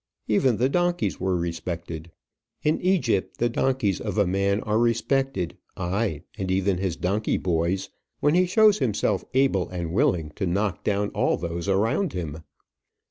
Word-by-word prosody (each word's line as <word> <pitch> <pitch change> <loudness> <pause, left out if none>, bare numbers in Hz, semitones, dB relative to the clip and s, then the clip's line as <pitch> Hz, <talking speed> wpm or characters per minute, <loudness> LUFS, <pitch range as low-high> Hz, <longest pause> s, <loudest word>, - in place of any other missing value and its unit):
Even 115 +2 +3
the 125 - +3
donkeys 175 +4 0
were 95 0 0
respected. 85 -1 -4 0.5
In 155 +1 +1
Egypt 120 - +1
the 120 - +1
donkeys 120 -5 0
of 105 -2 -3
a 100 - +4
man 100 +2 +1
are 110 0 0
respected, 120 -4 0 0.2
ay, 95 -3 -1 0.2
and 95 -1 -2
even 95 0 +1
his 95 -3 -1
donkey 100 +5 0
boys, 85 +2 -1 0.3
when 150 - +3
he 180 +1 +4
shows 215 +2 +5
himself 110 -6 0
able 130 -9 +2
and 85 -2 -4
willing 90 - +1
to 95 - -1
knock 100 +2 -1
down 105 0 0
all - - +1
those 85 +2 -4
around 115 - +1
him. 80 -4 -4
100 Hz, 155 wpm, -25 LUFS, 90-130 Hz, 0.5 s, shows